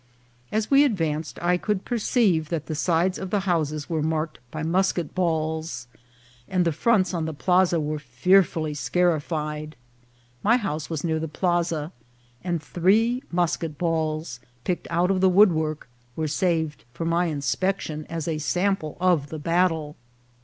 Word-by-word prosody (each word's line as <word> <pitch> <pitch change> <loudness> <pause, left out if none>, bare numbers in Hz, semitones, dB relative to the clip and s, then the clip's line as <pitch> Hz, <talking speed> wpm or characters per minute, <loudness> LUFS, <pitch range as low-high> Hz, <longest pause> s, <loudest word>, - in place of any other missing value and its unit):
As 215 +3 -1
we 275 +1 +7
advanced 165 - -1
I 180 +1 +3
could 205 +1 -2
per 240 -2 -1
ceive 190 - +2
that 160 -3 -2
the 160 - -4
sides 170 +4 +1
of 190 - -5
the 205 +1 +1
houses 155 -5 -1
were 160 -2 -1
marked 155 0 -2
by 155 +3 -5
mus 185 +4 +2
ket 170 -5 -4
balls, 160 -5 -1 0.6
and 180 -2 +1
the 170 - +2
fronts 185 +3 +2
on 165 -3 -1
the 160 -1 -4
plaza 180 +1 +3
were 150 0 -2
fearfully 155 +4 +2
scarified. 155 -2 -1 0.7
My 230 +4 +4
house 160 -10 -3
was 160 -3 -3
near 160 -2 0
the 160 - -3
plaza, 170 -2 -1 0.5
and 175 -3 -2
three 220 +10 +2
musket 170 -3 -1
balls, 155 -5 -1 0.2
picked 180 - -2
out 175 +2 +2
of 185 -1 +1
the 190 - +5
woodwork, 160 -7 +3 0.3
were 160 -1 -1
saved 160 -1 0
for 165 - -3
my 170 +2 +2
inspection, 155 +2 -2
as 165 -1 -4
a 160 -2 -1
sample 175 0 -1
of 175 -6 +2
the 160 - -5
battle. 165 -1 0
165 Hz, 160 wpm, -25 LUFS, 155-185 Hz, 0.7 s, we